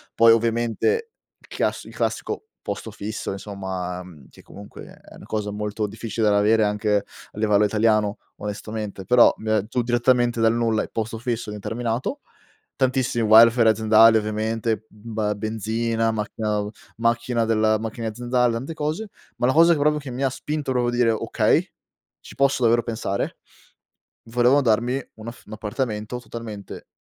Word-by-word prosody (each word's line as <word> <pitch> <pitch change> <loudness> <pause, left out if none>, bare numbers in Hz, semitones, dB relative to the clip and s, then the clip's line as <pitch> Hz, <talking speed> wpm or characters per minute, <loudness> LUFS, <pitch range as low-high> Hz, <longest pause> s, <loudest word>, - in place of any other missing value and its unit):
Poi, 115 0 +7
ovviamente 120 - +1 0.3
il - - -22
chiass - - -2
il - - -13
classico - - -2 0.2
posto 105 +2 -5
fisso, 105 0 -5
insomma, 95 -3 -5
mhmm, 80 -7 -15
che - - -17
comunque 100 +1 -12
è - - -16
una - - -13
cosa 105 -1 -3
molto 105 +1 -3
difficile 110 +1 -2
da 100 - +3
avere 110 +2 +4
anche 105 0 +1
a 100 +1 -10
livello 105 -1 +3
italiano 105 -1 +2 0.2
onestamente, 105 -1 -5
però 125 +5 +6
mi 110 - -5
ha 110 -2 +2
giù 125 +3 -1
direttamente 120 0 +2
dal 115 0 +4
nulla, 115 -2 +1
i - - -8
posto 115 0 -3
fisso 120 -1 -3
indeterminato. 115 - -3 0.6
Tantissimi 130 -3 +1
welfare 115 +1 +7
aziendali 110 +1 +5
ovviamente, 110 +1 -2
ba 105 -1 -3
benzina, 115 +2 -1
macchina 110 0 -3
au 105 0 -3 0.3
macchina 115 0 +1
della 110 -1 +2
macchine 115 +1 -5
aziendale, 120 +2 0
tante 130 +7 -4
cose, 160 +7 -3 0.3
ma 120 - +2
la - - +3
cosa 165 +3 +6
che 155 - 0
proprio 150 +1 +3
che 140 -4 -8
mi 130 - -4
ha 135 - +3
spinto 150 +1 -4
proprio 125 -1 +1
dire: 120 -1 +2
"Okay, 110 - +1 0.5
ci - - -14
posso 135 -1 +2
davvero 120 0 +3
pensare": 110 -4 -3 0.9
volevano 125 +4 +3
darmi 120 +1 +1
un 110 +1 -10
aff 115 - -10
un 105 - -13
appartamento 110 +1 -3
totalmente 110 -4 -8
115 Hz, 160 wpm, -23 LUFS, 105-120 Hz, 0.9 s, Poi